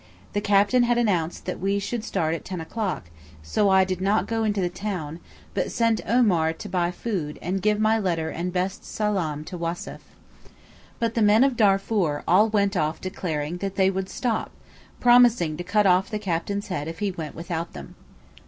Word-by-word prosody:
The 205 - 0
captain 205 +4 +4
had 240 0 +2
announced 180 -8 0
that - - -4
we 195 +2 0
should 215 +3 -3
start 160 -7 -1
at 165 - -4
ten 185 -2 -5
o'clock, 170 - -4 0.3
so 200 - +1
I 190 0 +5
did 185 -1 -3
not 200 +3 +2
go 225 -1 -1
into 210 -2 0
the 180 - +1
town, 175 -5 -5 0.3
but - - -1
sent 230 -2 +1
Omar 190 -9 +3
to - - -9
buy 175 -2 0
food 180 -5 -4
and 185 +3 -2
give 210 +1 +2
my 220 +1 +3
letter 170 -5 -1
and 175 +2 -3
best 185 +2 -2
salaam 180 -9 -2
to 180 +2 -8
Wassef. 170 +1 -4 1.0
But 230 -1 -1
the 230 - 0
men 210 +3 +5
of 270 -2 +2
Darfoor 195 -7 +2
all 205 +6 +5
went 200 -2 +1
off 155 -2 0
declaring 165 -3 -3
that 195 +1 -4
they 190 0 +3
would 190 0 -3
stop, 235 -4 -2 0.5
promising 240 -10 +5
to 175 - -4
cut 205 +3 +2
off 185 0 +3
the 215 - -2
captain's 200 +1 -3
head 155 -5 -3
if 165 0 -6
he 205 +1 -1
went 160 -4 -7
without 170 0 -4
them. - - -9
190 Hz, 190 wpm, -25 LUFS, 170-210 Hz, 1.0 s, I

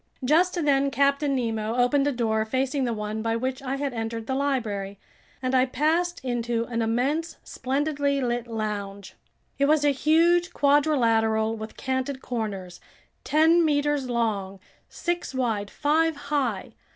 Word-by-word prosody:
Just 345 +7 +3
then 275 -1 +3
Captain 280 +1 +1
Nemo 225 -3 -2
opened 250 +3 +2
a - - +2
door 220 -4 0
facing 260 +4 -1
the 240 - -1
one 210 0 -4
by 225 0 0
which 260 +3 -3
I 270 0 -3
had 275 -1 -3
entered 225 -1 -4
the 265 - -2
library, 220 -8 -2 0.5
and 255 0 -1
I 260 0 +4
passed 330 +6 0
into 240 -2 -1
an 230 -1 -1
immense, 265 +9 -1
splendidly 280 +1 -1
lit 240 -2 -2
lounge. 205 -3 -5 0.5
It 280 - +4
was 295 0 +3
a 290 - +5
huge 335 +5 +3
quadrilateral 230 -7 +2
with 220 0 -8
canted 260 +1 -2
corners, 200 -8 -5 0.4
ten 320 +3 +4
meters 290 -3 +1
long, 205 -5 -1 0.3
six 345 -5 -3
wide, 225 -6 -1
five 315 +5 +1
high. 280 -8 -2
260 Hz, 145 wpm, -25 LUFS, 225-290 Hz, 0.5 s, a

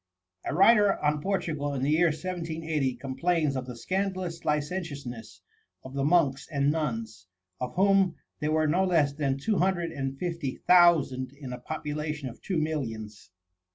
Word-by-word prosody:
A - - -2
writer 205 +2 +5
on 150 0 +2
Portugal, 155 -7 -1
in 130 - -2
the 140 - +2
year 165 +3 +4
1780, 160 -5 -2
complains 150 +2 0
of 130 -1 -3
the 125 - -6
scandalous 185 +2 -3
licentiousness 145 -6 -3 0.4
of 130 - -10
the 140 0 -1
monks 145 -3 +2
and 140 -1 +2
nuns, 115 - -3 0.3
of 125 -1 -4
whom 195 -1 +4 0.2
there 150 -1 -1
were 155 0 +2
no 170 +5 +2
less 160 -6 +2
than 140 -2 -1
two 205 +9 0
hundred 175 -2 +1
and 135 -2 -4
fifty 165 -5 -3
thousand 155 -8 +5
in 140 -3 -8
a 125 - -6
population 150 0 -4
of 115 - -13
two 185 - -2
millions. 115 - -3
150 Hz, 155 wpm, -28 LUFS, 135-175 Hz, 0.4 s, writer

